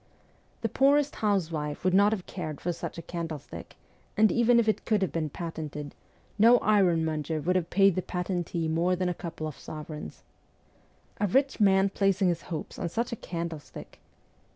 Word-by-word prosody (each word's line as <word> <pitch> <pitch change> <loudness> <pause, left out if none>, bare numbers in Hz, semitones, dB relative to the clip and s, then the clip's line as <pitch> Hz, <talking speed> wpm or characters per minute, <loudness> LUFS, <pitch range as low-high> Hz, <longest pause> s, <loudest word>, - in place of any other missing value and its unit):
The - - +1
poorest 285 +1 +3
housewife 165 -8 -1
would 185 0 +2
not 200 +2 +5
have 200 -5 -3
cared 155 -6 -6
for 175 - -2
such - - -6
a 165 - -6
candlestick, 165 -3 -7 0.4
and 215 0 +5
even 235 0 +4
if 230 - +1
it 215 - +1
could 215 -4 +1
have 190 - -1
been 160 -2 -2
patented, 150 -3 -6 0.5
no 235 +3 +7
ironmonger 165 -7 +1
would 180 +5 0
have 175 -2 0
paid 195 0 +4
the 185 - -1
patentee 175 -2 -2
more 170 +3 +1
than 180 0 -1
a - - 0
couple 165 -2 -6
of 155 -3 -6
sovereigns. 150 - -8 0.5
' - - -35
A 205 - +3
rich 270 +7 +1
man 195 -1 +4
placing 195 -1 +2
his 170 -1 -1
hopes 160 -3 -5
on 170 - -2
such 235 +8 -2
a - - -2
candlestick 170 -6 -7
180 Hz, 175 wpm, -28 LUFS, 160-205 Hz, 0.5 s, no